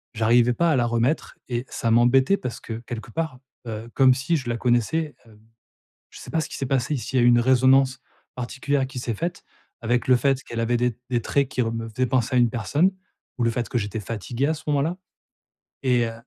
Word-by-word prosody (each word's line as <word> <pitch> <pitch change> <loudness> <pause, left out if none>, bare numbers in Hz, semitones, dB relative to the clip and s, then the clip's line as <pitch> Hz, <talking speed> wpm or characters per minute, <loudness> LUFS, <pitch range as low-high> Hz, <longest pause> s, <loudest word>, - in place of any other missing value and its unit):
j'arrivais 120 +2 +4
pas 170 +5 +2
à 150 - +3
la 120 - +2
remettre 120 +6 -1
et 120 0 -2
ça 115 - -1
m'embêtait 130 +9 +4
parce 125 -8 -5
que 115 - -6
quelque 115 -1 -6
part, 160 -2 -3 0.3
heu, 110 +1 -6
comme 130 -2 +6
si 145 +6 0
je 130 -5 -6
la 120 - 0
connaissais, 125 +6 +1
heu. 110 -2 -18 0.7
Je - - -12
sais - - -10
pas 165 - +1
ce 155 - -4
qui - - -6
s'est 135 - -3
passé, 135 +2 0
s'il 130 +1 -2
y 120 - +4
a - - +5
une 120 0 +6
résonance 130 +1 +4 0.4
particulière 135 +2 -1
qui 130 -1 -8
s'est 120 - -2
faite 170 - -4 0.4
avec 120 +2 0
le 125 - +6
fait 135 +1 +1
qu'elle 115 -1 -4
avait 120 +1 +1
des 125 -2 0
des 120 -1 +1
traits 140 +1 +1
qui 130 - -1
re 115 -1 -1
me 115 0 -4
faisaient 125 +3 -1
penser 130 0 0
à - - +5
une 120 -2 +3
personne 145 - +1 0.5
ou 120 - +1
le 115 - +3
fait 120 +1 -3
que - - -3
j'étais 105 +1 -3
fatigué 115 +5 -3
à 160 - +1
ce 155 - -10
moment-là 150 +4 +1 0.9
et 125 -2 +3
heu 115 - -6
125 Hz, 230 wpm, -24 LUFS, 115-135 Hz, 0.9 s, comme